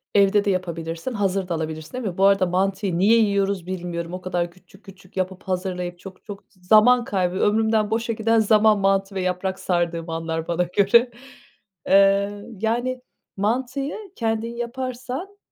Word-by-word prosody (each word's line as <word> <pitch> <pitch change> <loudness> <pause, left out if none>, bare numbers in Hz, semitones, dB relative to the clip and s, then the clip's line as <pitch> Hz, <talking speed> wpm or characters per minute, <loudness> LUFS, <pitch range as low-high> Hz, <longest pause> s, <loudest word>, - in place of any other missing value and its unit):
evde 200 +1 +4
de - - +1
yapabilirsin, 170 +3 -3
hazır 195 -3 -1
da 170 - -2
alabilirsin, 160 +2 -5
değil 255 -1 -4
mi? 180 - -5
Bu 195 - +4
arada 195 -1 +4
mantıyı 190 0 -1
niye 215 +5 +5
yiyoruz 200 -4 +1
bilmiyorum. 175 -2 -5
O 185 - -5
kadar 175 -1 -2
küçük 185 +3 -21
küçük 190 -1 -15
yapıp, 185 0 -3
hazırlayıp 180 -1 -3
çok 190 -1 -12
çok 205 -2 -9 0.2
zaman 220 +6 +5
kaybı 185 -4 -1
ömrümden 220 0 +2
boşa 230 +1 -1
giden 225 +1 +2
zaman, 215 -1 +4
mantı 195 0 +1
ve 190 - -1
yaprak 185 +1 -2
sardığım 170 -2 -1
anlar 165 0 -3
bana 175 +1 +1
göre. 205 +7 +3 0.8
Eee, 200 +1 +4 0.2
yani, 245 +3 -1 0.4
mantıyı 255 +7 -1 0.2
kendin 225 0 -2
yaparsan, 255 +9 -5
195 Hz, 155 wpm, -23 LUFS, 180-220 Hz, 0.8 s, niye